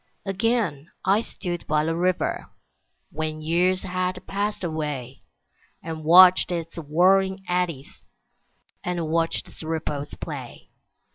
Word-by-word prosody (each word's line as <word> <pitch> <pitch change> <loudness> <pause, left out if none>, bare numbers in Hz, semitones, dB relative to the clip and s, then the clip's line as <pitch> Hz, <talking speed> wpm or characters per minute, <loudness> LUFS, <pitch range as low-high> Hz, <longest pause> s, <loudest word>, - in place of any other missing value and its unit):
Again 195 - 0 0.2
I 195 +3 +4
stood 175 -6 -6
by 150 0 +2
the 165 0 0
river, 180 +1 0 0.6
When 155 0 -4
years 180 +3 +2
had 185 0 -2
passed 205 +1 -2
away, 150 -6 -4 0.6
And 160 -1 -6
watched 180 +3 +7
its 165 -1 -4
whirling 190 +5 +2
eddies, 175 -6 -2 0.8
And 175 -3 -2
watched 165 0 0
its - - -13
ripples 150 -3 -4
play. - - -8
170 Hz, 115 wpm, -24 LUFS, 155-185 Hz, 0.8 s, watched